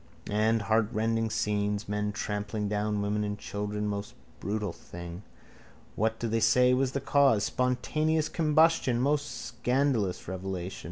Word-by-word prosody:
And 110 +1 +2
heartrending 115 +1 +1
scenes. 105 -1 -1
Men 105 0 -1
trampling 105 0 -3
down 105 0 -1
women 105 +1 0
and 105 0 -3
children. 105 +1 -4
Most 100 0 -4 0.2
brutal 105 -3 -2
thing. 85 +1 -9 0.7
What 110 +1 0
do 115 - -2
they 115 0 +1
say 125 +3 +5
was 130 0 +1
the 140 - 0
cause? 135 -6 +4
Spontaneous 155 +5 0
combustion. 155 -5 +3
Most 145 +3 +1
scandalous 120 -5 -1
revelation. 95 0 -4
110 Hz, 130 wpm, -29 LUFS, 105-125 Hz, 0.7 s, say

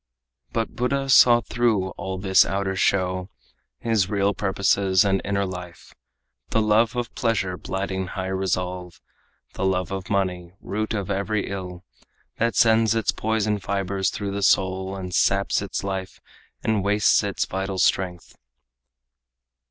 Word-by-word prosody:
But 115 -1 -1
Buddha 135 +2 -1
saw 120 -2 +7
through 115 -6 0
all 95 0 -5
this 95 0 +5
outer 95 0 -2
show 95 -1 0 0.5
His 110 -5 +1
real 100 -1 +1
purposes 95 -1 +2
and 95 -1 +1
inner 100 0 0
life: 90 -2 -9 0.6
The - - +1
love 110 +2 +3
of 120 -1 -3
pleasure 105 -6 0
blighting 95 0 -3
high 95 +1 -4
resolve, 90 -2 -3 0.5
The - - -4
love 95 -2 0
of 95 -1 -5
money, 90 -3 -1
root 110 +2 -3
of 100 -2 -3
every 100 +2 -1
ill, 90 -2 -6 0.5
That 115 0 0
sends 115 0 +4
its 110 -2 +1
poison 110 -1 -1
fibers 95 0 -1
through 100 -1 -4
the 100 +1 -3
soul 95 0 +1
And 90 -2 -6
saps 100 +2 +2
its 100 -1 -4
life 95 -1 -4 0.4
and 110 -3 +1
wastes 105 +1 +3
its 100 -2 -1
vital 95 0 -3
strength. 90 -2 0
95 Hz, 140 wpm, -24 LUFS, 95-105 Hz, 0.6 s, saw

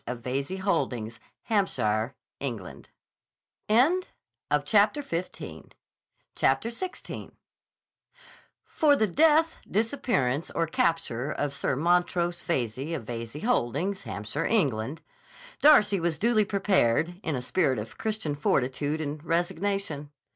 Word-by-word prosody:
of 125 -1 -4
Veyze 135 +9 -2
Holdings, 120 - -1 0.2
Hampshire, 125 - 0 0.2
England. 115 -10 -6 0.8
CHAPTER 220 - +2
XVI 170 -6 -6 3.0
FOR 295 -2 +3
the 220 - +3
death, 315 - +3
disappearance, 200 - 0
or 165 - 0
capture 155 -5 0
of 145 -2 -2
Sir 140 -1 -1
Montrose 175 +2 +1
Veyze, 135 +1 -2
of 135 - -5
Veyze 115 +5 -6
Holdings, 195 - 0
Hampshire, 110 +5 -3
England, 140 - 0 0.6
Darcy 210 -9 +6
was 170 -1 0
duly 220 0 +3
prepared, 180 - +1
in 160 -7 -2
a 125 - -2
spirit 135 -2 +1
of 110 +1 -7
Christian 215 -9 -2
fortitude 145 +2 0
and 150 0 -4
resignation. 175 -2 -1
165 Hz, 100 wpm, -27 LUFS, 130-200 Hz, 3.0 s, Darcy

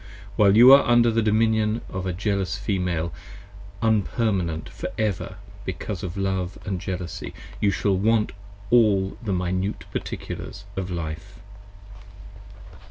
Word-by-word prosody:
While 100 0 +5
you 125 +3 +10
are 140 - +8
under 120 -1 +4
the 115 +1 +2
dominion 110 0 +2
of 95 0 -4
a - - 0
jealous 100 +1 -1
Female, 90 -5 -1 0.7
Unpermanent 105 -6 0
for - - -6
ever 100 -4 -1 0.3
because 95 +1 -5
of 90 +1 -5
love 95 -1 -1
& 95 - -1
jealousy, 90 -2 -5 0.2
You 100 - +3
shall 100 0 +1
want 110 +2 +2 0.4
all 100 -5 +4
the 110 -4 -3
Minute 95 +2 -1
Particulars - - -6
of 95 -1 -3
Life. 80 -3 -6
100 Hz, 125 wpm, -24 LUFS, 90-110 Hz, 0.7 s, you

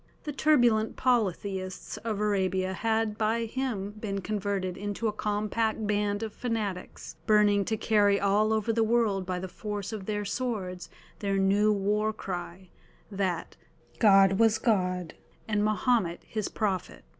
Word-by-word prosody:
The 300 - -4
turbulent 240 -8 +3
polytheists 195 -6 -1
of 220 -2 -3
Arabia 190 -2 0
had 220 0 0
by 225 +2 +1
him 225 -5 -3
been 210 -2 -4
converted 200 -2 -2
into 205 +3 -3
a 210 - -1
compact 215 +1 -1
band 205 0 0
of 220 - -5
fanatics, 215 -6 -4
burning 210 -2 +4
to 220 - -1
carry 205 -2 +3
all 205 +2 +2
over 220 +1 +1
the 225 0 +2
world 220 -5 +1
by 185 -1 -1
the 185 +1 -4
force 205 +2 -5
of 200 -3 -6
their 210 -1 -2
swords 195 -8 -3 0.3
their 200 -1 0
new 200 +2 +3
war 210 +2 +1
cry, 180 -2 -6 0.4
that 190 -4 -2 0.4
"God 195 -2 +6
was 225 -1 +4
God, 185 -6 0 0.3
and 210 -1 +1
Mahomet 215 -4 +1
His 215 -2 -3
prophet." 195 - -2
210 Hz, 145 wpm, -28 LUFS, 195-220 Hz, 0.4 s, God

